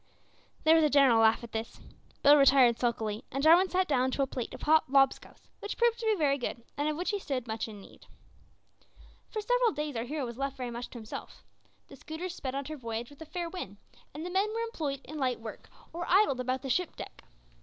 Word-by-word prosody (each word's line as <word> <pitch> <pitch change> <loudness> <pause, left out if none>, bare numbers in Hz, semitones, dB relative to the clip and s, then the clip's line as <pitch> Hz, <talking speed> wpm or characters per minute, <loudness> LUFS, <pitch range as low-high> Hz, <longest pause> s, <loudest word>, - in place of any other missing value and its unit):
There 315 - +6
was 325 -1 +5
a 300 - +4
general 275 -5 +5
laugh 225 +1 +4
at 235 - -9
this. 225 0 -5 0.4
Bill 290 +1 +8
retired 270 -4 +5
sulkily, 220 -3 -1
and 275 +2 -2
Jarwin 345 +4 +6
sat 370 0 +1
down 260 -3 +2
to 275 +1 0
a - - +2
plate 255 -3 -5
of - - -10
hot 315 -2 +4
"lob 270 -1 +5
scouse," - - -18
which 410 - -5
proved 470 -1 +2
to 455 - -3
be 435 - +3
very 285 -5 +1
good, 240 -1 -4
and 290 +1 0
of 305 - -3
which 355 +4 -1
he 410 - -2
stood 270 -9 -3
much 220 0 -3
in 210 -2 -10
need. - - -16 1.2
For 430 - -3
several - - +2
days 295 -2 -4
our 230 +1 -2
hero 290 +1 -3
was 235 +1 -8
left 275 0 -3
very 250 -2 -4
much 240 +1 -6
to - - -10
himself. 220 -2 -9 0.4
The - - -12
schooner 315 +6 -6
sped 275 -7 -5
on 275 0 -3
her 310 +2 -6
voyage 230 0 -5
with 285 - -17
a 320 - -8
fair 345 +2 -4
wind, 335 - -7 0.3
and 305 +4 -7
the 355 - -5
men 395 +3 +1
were 455 +1 -2
employed 310 - -3
in 310 0 -8
light 255 -3 0
work, 225 -2 -9 0.2
or 345 +1 -5
idled 370 -9 +4
about 255 +1 -2
the 305 +6 0
deck. - - -9
280 Hz, 235 wpm, -30 LUFS, 245-340 Hz, 1.2 s, Bill